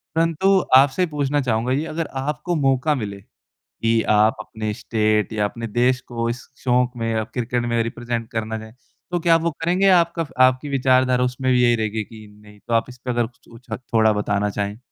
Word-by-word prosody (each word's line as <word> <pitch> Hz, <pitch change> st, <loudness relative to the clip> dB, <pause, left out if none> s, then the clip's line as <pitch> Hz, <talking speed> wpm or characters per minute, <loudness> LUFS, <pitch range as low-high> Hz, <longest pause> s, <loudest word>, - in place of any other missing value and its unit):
परंतु 165 Hz, +4 st, +3 dB, 0.2 s
आपसे 135 Hz, +6 st, +5 dB
पूछना 145 Hz, -2 st, -1 dB
चाहूँगा 120 Hz, -1 st, -1 dB
ये 145 Hz, +4 st, 0 dB
अगर 165 Hz, -1 st, -2 dB
आपको 150 Hz, +5 st, -2 dB
मौका 135 Hz, +3 st, +2 dB
मिले 100 Hz, -1 st, -6 dB, 0.4 s
कि 115 Hz, 0 st, -1 dB
आप 105 Hz, +1 st, +4 dB
अपने 110 Hz, 0 st, -5 dB
स्टेट 110 Hz, -2 st, 0 dB
या 105 Hz, -1 st, 0 dB
अपने 115 Hz, +3 st, -4 dB
देश 125 Hz, +3 st, +1 dB
को 115 Hz, 0 st, -1 dB
इस 120 Hz, +1 st, -5 dB, 0.2 s
शौक़ 125 Hz, 0 st, +1 dB
में 115 Hz, 0 st, -2 dB
या 110 Hz, -1 st, 0 dB
क्रिकेट 125 Hz, 0 st, -1 dB
में 115 Hz, -1 st, +1 dB
रिप्रेज़ेंट 115 Hz, 0 st, -4 dB
करना 110 Hz, 0 st, -3 dB
चाहें 110 Hz, +1 st, -11 dB, 0.4 s
तो 175 Hz, -, 0 dB
क्या 165 Hz, 0 st, +4 dB
आप 165 Hz, -, +3 dB
वो 170 Hz, -, +1 dB
करेंगे? 180 Hz, +4 st, +2 dB
या 185 Hz, -2 st, +7 dB
आपका 170 Hz, -1 st, -2 dB, 0.2 s
आपकी 130 Hz, +3 st, -1 dB
विचारधारा 130 Hz, -2 st, +2 dB
उसमें 130 Hz, +1 st, 0 dB
भी 125 Hz, -1 st, +3 dB
यही 120 Hz, -1 st, +4 dB
रहेगी 110 Hz, -1 st, -2 dB
कि 110 Hz, 0 st, -13 dB, 0.2 s
नहीं? 105 Hz, 0 st, -16 dB
तो 115 Hz, -, -3 dB
आप 115 Hz, -, +3 dB
इस 125 Hz, 0 st, -12 dB
पर 125 Hz, 0 st, -5 dB
अगर 120 Hz, -1 st, +1 dB
कुछ 120 Hz, -, -21 dB
कुछ 115 Hz, +2 st, -15 dB, 0.2 s
थोड़ा 110 Hz, -1 st, +4 dB
बताना 105 Hz, 0 st, 0 dB
चाहें? 100 Hz, +1 st, -3 dB
120 Hz, 205 wpm, -21 LUFS, 110-135 Hz, 0.4 s, या